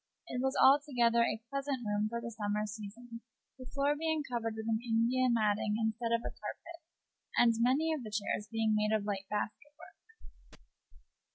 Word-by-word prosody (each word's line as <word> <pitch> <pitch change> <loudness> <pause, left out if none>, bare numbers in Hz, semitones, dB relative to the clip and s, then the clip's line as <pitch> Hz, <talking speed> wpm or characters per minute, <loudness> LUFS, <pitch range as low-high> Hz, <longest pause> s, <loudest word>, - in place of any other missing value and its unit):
It 250 - -3
was 265 0 0
altogether 255 -4 +5
a 225 -1 0
pleasant 275 -3 -2
room 210 0 0
for 235 +1 -3
the 235 0 -6
summer 210 -1 -1
season, 225 +3 -8 0.4
the 255 - -9
floor 280 +2 +1
being 315 0 -1
covered 230 -4 -3
with 220 - -5
an 220 -1 +1
India 240 +2 +2
matting 210 -2 +1
instead 225 +1 -1
of 230 0 +2
a - - -5
carpet, 340 0 -8 0.6
and 235 -1 +6
many 275 +7 +3
of 305 - -3
the 220 - -7
chairs 210 0 -2
being 225 -1 +1
made 215 0 +2
of 210 -2 -1
light 195 -2 -3
basket 215 +7 -4
work. 450 0 -19
230 Hz, 175 wpm, -33 LUFS, 215-260 Hz, 0.6 s, and